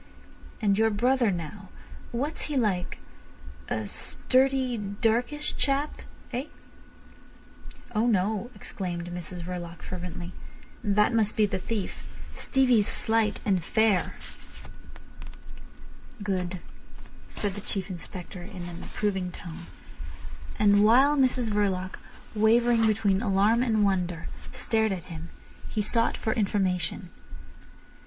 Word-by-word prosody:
And 200 Hz, -1 st, +3 dB
your 225 Hz, 0 st, +5 dB
brother 240 Hz, +2 st, +3 dB
now, 185 Hz, +2 st, -5 dB, 0.4 s
what's 280 Hz, +6 st, -2 dB
he 295 Hz, -2 st, -2 dB
like—a 110 Hz, -, -4 dB
sturdy, 260 Hz, -, +1 dB
darkish 230 Hz, +8 st, 0 dB
chap—eh?" 275 Hz, -2 st, -2 dB, 1.5 s
"Oh 220 Hz, +2 st, +2 dB
no," 215 Hz, +1 st, +1 dB
exclaimed 175 Hz, -2 st, -5 dB
Mrs 175 Hz, 0 st, -5 dB
Verloc 175 Hz, -1 st, -6 dB
fervently. 180 Hz, 0 st, -6 dB, 0.5 s
"That 210 Hz, +2 st, +3 dB
must 220 Hz, -2 st, +2 dB
be 215 Hz, -, +5 dB
the 195 Hz, -2 st, -2 dB
thief. 205 Hz, 0 st, -4 dB, 0.3 s
Stevie's 250 Hz, -6 st, +3 dB
slight 220 Hz, -1 st, +1 dB
and 190 Hz, -4 st, +2 dB
fair." 220 Hz, -1 st, +2 dB, 2.1 s
"Good," 185 Hz, -3 st, -2 dB, 0.7 s
said 205 Hz, -2 st, -2 dB
the 205 Hz, -, -6 dB
Chief 195 Hz, -1 st, -2 dB
Inspector 180 Hz, 0 st, -6 dB
in 185 Hz, -1 st, -8 dB
an 175 Hz, -1 st, -7 dB
approving 190 Hz, -4 st, -2 dB
tone. 170 Hz, 0 st, -9 dB, 0.9 s
And 205 Hz, -1 st, +5 dB
while 260 Hz, +7 st, +6 dB
Mrs 255 Hz, -4 st, +2 dB
Verloc, 190 Hz, -3 st, 0 dB, 0.3 s
wavering 225 Hz, +1 st, +4 dB
between 205 Hz, -2 st, +2 dB
alarm 210 Hz, +2 st, +3 dB
and 220 Hz, -4 st, +2 dB
wonder, 180 Hz, -4 st, 0 dB, 0.2 s
stared 220 Hz, -1 st, +1 dB
at 185 Hz, -3 st, -3 dB
him, 160 Hz, +1 st, -7 dB, 0.4 s
he 215 Hz, -, -1 dB
sought 230 Hz, +2 st, +1 dB
for 220 Hz, -, 0 dB
information. 185 Hz, -4 st, 0 dB
205 Hz, 105 wpm, -27 LUFS, 180-230 Hz, 2.1 s, while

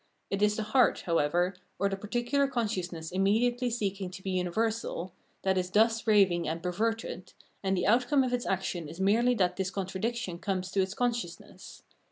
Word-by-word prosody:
It 195 Hz, 0 st, -1 dB
is 210 Hz, 0 st, +3 dB
the 220 Hz, -, -2 dB
heart, 250 Hz, +3 st, +3 dB
however, 170 Hz, +2 st, +1 dB, 0.2 s
or 200 Hz, -, +1 dB
the 195 Hz, -, -1 dB
particular 240 Hz, +7 st, 0 dB
consciousness 185 Hz, -10 st, -3 dB
immediately 235 Hz, +6 st, +2 dB
seeking 200 Hz, -5 st, -2 dB
to 190 Hz, +1 st, -10 dB
be 190 Hz, -, -2 dB
universal, 185 Hz, 0 st, -1 dB, 0.3 s
that 190 Hz, -1 st, +2 dB
is 180 Hz, 0 st, -2 dB
thus 225 Hz, +3 st, +2 dB
raving 190 Hz, -5 st, +4 dB
and 165 Hz, +2 st, -3 dB
perverted, 215 Hz, +1 st, -2 dB, 0.3 s
and 195 Hz, -1 st, 0 dB
the 180 Hz, -, 0 dB
outcome 245 Hz, +6 st, +4 dB
of 250 Hz, -1 st, -1 dB
its 245 Hz, -1 st, -1 dB
action 175 Hz, -4 st, -2 dB
is 165 Hz, +3 st, -10 dB
merely 230 Hz, +6 st, +3 dB
that 180 Hz, -4 st, +1 dB
this 190 Hz, -1 st, -1 dB
contradiction 195 Hz, 0 st, -3 dB
comes 185 Hz, -1 st, -2 dB
to 195 Hz, -, +2 dB
its 190 Hz, +1 st, -2 dB
consciousness. 235 Hz, -8 st, -4 dB
195 Hz, 175 wpm, -29 LUFS, 180-230 Hz, 0.3 s, raving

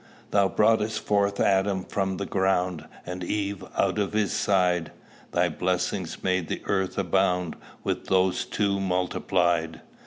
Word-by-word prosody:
Thou 100 Hz, -1 st, +4 dB
brought'st 110 Hz, +1 st, +2 dB
forth 100 Hz, -1 st, +1 dB
Adam 95 Hz, -1 st, +2 dB
from 95 Hz, -1 st, -2 dB
the 100 Hz, -, -3 dB
ground, 90 Hz, -4 st, 0 dB, 0.2 s
And 90 Hz, 0 st, -5 dB
Eve 100 Hz, +1 st, -2 dB
out -, -, +2 dB
of 100 Hz, 0 st, -1 dB
his 105 Hz, -1 st, +1 dB
side: 90 Hz, -6 st, +1 dB, 0.4 s
Thy -, -, +2 dB
blessing 90 Hz, 0 st, -1 dB, 0.2 s
made 90 Hz, -3 st, +1 dB
the -, -, -4 dB
earth 95 Hz, -2 st, -1 dB
abound 90 Hz, -2 st, +1 dB, 0.3 s
With -, -, -2 dB
these 95 Hz, -1 st, +2 dB
two 100 Hz, -2 st, 0 dB
multiplied. 90 Hz, -3 st, 0 dB
95 Hz, 135 wpm, -26 LUFS, 90-100 Hz, 0.4 s, Thou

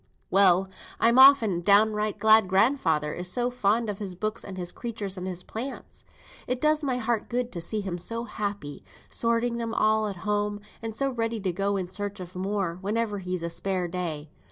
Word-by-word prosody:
Well, 190 Hz, -1 st, +5 dB, 0.3 s
I'm 235 Hz, +2 st, +4 dB
often 240 Hz, -10 st, +7 dB
downright 210 Hz, +2 st, +3 dB
glad 220 Hz, -2 st, +5 dB
grandfather 185 Hz, -, +2 dB
is 180 Hz, +1 st, -2 dB
so 245 Hz, +4 st, 0 dB
fond 230 Hz, -1 st, +1 dB
of 205 Hz, -2 st, -4 dB
his 195 Hz, -4 st, -5 dB
books, 215 Hz, +4 st, -3 dB
and 190 Hz, -1 st, -8 dB
his 180 Hz, -1 st, -4 dB
creatures, 215 Hz, -5 st, -5 dB
and 185 Hz, -1 st, -5 dB
his 180 Hz, -1 st, -5 dB
plants. 255 Hz, +5 st, -7 dB, 0.4 s
It 250 Hz, 0 st, -1 dB
does 305 Hz, +2 st, +2 dB
my 260 Hz, -3 st, 0 dB
heart 235 Hz, -2 st, -1 dB
good 245 Hz, 0 st, -2 dB
to 175 Hz, -, -5 dB
see 210 Hz, +5 st, -1 dB
him 180 Hz, -3 st, -4 dB
so 230 Hz, +6 st, -3 dB
happy, 200 Hz, -10 st, -5 dB, 0.3 s
sorting 235 Hz, 0 st, +1 dB
them 230 Hz, -1 st, -3 dB
all 215 Hz, 0 st, +2 dB
at 200 Hz, -, -4 dB
home, 205 Hz, 0 st, 0 dB, 0.2 s
and 225 Hz, -1 st, -5 dB
so 275 Hz, +3 st, 0 dB
ready 230 Hz, -2 st, -2 dB
to 190 Hz, -2 st, -1 dB
go 200 Hz, +3 st, -1 dB
in 185 Hz, -2 st, -3 dB
search 205 Hz, +2 st, -5 dB
of 180 Hz, 0 st, -9 dB
more, 185 Hz, -2 st, -2 dB
whenever 210 Hz, +1 st, -1 dB
he's 180 Hz, -2 st, -4 dB
a 170 Hz, -, -2 dB
spare 185 Hz, 0 st, -2 dB
day. 165 Hz, -4 st, -4 dB
205 Hz, 195 wpm, -26 LUFS, 185-230 Hz, 0.4 s, often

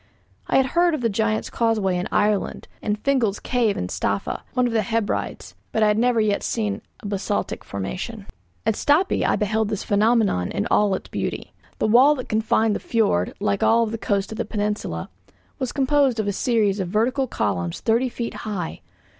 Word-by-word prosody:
I -, -, +3 dB
had 265 Hz, -, +4 dB
heard 345 Hz, -1 st, +3 dB
of 295 Hz, -, -5 dB
the 230 Hz, -, +2 dB
Giant's 220 Hz, +1 st, 0 dB
Causeway 215 Hz, -5 st, +1 dB
in 180 Hz, +1 st, -2 dB
Ireland, 210 Hz, -1 st, 0 dB
and 210 Hz, -1 st, -1 dB
Fingal's 230 Hz, -4 st, +1 dB
Cave 235 Hz, -5 st, 0 dB
in -, -, -2 dB
Staffa, 100 Hz, +1 st, -2 dB
one 250 Hz, -1 st, +3 dB
of 240 Hz, -, -1 dB
the 220 Hz, -, +3 dB
Hebrides; 220 Hz, +1 st, -2 dB, 0.2 s
but 220 Hz, -, +2 dB
I -, -, +5 dB
had 210 Hz, +1 st, +2 dB
never 245 Hz, -1 st, +3 dB
yet 210 Hz, -2 st, +1 dB
seen 210 Hz, -3 st, -2 dB, 0.2 s
a -, -, -12 dB
basaltic 200 Hz, 0 st, -2 dB
formation. 185 Hz, -, -5 dB, 0.4 s
At -, -, +3 dB
Stapi 295 Hz, -, +2 dB
I -, -, +2 dB
beheld 215 Hz, 0 st, 0 dB
this 210 Hz, -3 st, -3 dB
phenomenon 210 Hz, -, +2 dB
in 100 Hz, -, -1 dB
all 205 Hz, -2 st, +3 dB
its -, -, -7 dB
beauty. -, -, -4 dB, 0.2 s
The -, -, 0 dB
wall 255 Hz, +7 st, +6 dB
that 255 Hz, -, -7 dB
confined 220 Hz, 0 st, +2 dB
the -, -, -2 dB
fiord, 205 Hz, -, +1 dB
like 100 Hz, 0 st, 0 dB
all 230 Hz, 0 st, +4 dB
the 225 Hz, 0 st, -4 dB
coast 200 Hz, -1 st, -1 dB
of 220 Hz, -, -6 dB
the -, -, +1 dB
peninsula, 205 Hz, -, -3 dB, 0.5 s
was 255 Hz, -, -2 dB
composed 275 Hz, -3 st, +2 dB
of 215 Hz, -, 0 dB
a 205 Hz, -, 0 dB
series 210 Hz, -2 st, +1 dB
of 185 Hz, -, -1 dB
vertical 250 Hz, +8 st, +1 dB
columns 90 Hz, -, -2 dB
thirty 235 Hz, +3 st, +1 dB
feet 235 Hz, -1 st, -4 dB
high. 195 Hz, -6 st, -5 dB
215 Hz, 190 wpm, -23 LUFS, 200-235 Hz, 0.5 s, wall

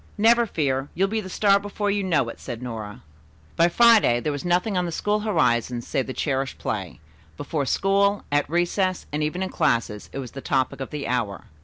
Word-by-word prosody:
"Never 230 Hz, +2 st, +4 dB
fear, 140 Hz, -5 st, -1 dB
you'll 195 Hz, +3 st, +2 dB
be 220 Hz, +1 st, -1 dB
the 190 Hz, -, -8 dB
star 200 Hz, +1 st, +3 dB
before 205 Hz, 0 st, -2 dB
you 200 Hz, 0 st, 0 dB
know 165 Hz, -9 st, +1 dB
it," -, -, -9 dB
said 120 Hz, +1 st, -7 dB
Nora. 110 Hz, -4 st, -7 dB, 0.5 s
By 170 Hz, +1 st, +4 dB
Friday, 220 Hz, -, +5 dB
there 150 Hz, -, -2 dB
was 145 Hz, -1 st, -4 dB
nothing 180 Hz, +4 st, +1 dB
on 180 Hz, -1 st, 0 dB
the -, -, -4 dB
school 210 Hz, +5 st, 0 dB
horizon 125 Hz, -, +1 dB
save 130 Hz, -, -2 dB
the -, -, -4 dB
cherished 135 Hz, 0 st, -2 dB
play. 95 Hz, -5 st, -4 dB, 0.4 s
Before 145 Hz, -4 st, -2 dB
school, 200 Hz, +5 st, +2 dB
at 145 Hz, 0 st, +1 dB
recess, 175 Hz, +2 st, 0 dB
and 150 Hz, -, -1 dB
even 155 Hz, +5 st, -1 dB
in 190 Hz, -, -3 dB
classes 110 Hz, -3 st, 0 dB
it -, -, -7 dB
was 130 Hz, -4 st, -6 dB
the 135 Hz, -, -8 dB
topic 130 Hz, 0 st, -1 dB
of 135 Hz, -, -4 dB
the 150 Hz, -2 st, -5 dB
hour. 115 Hz, -5 st, -2 dB
155 Hz, 205 wpm, -24 LUFS, 130-200 Hz, 0.5 s, Friday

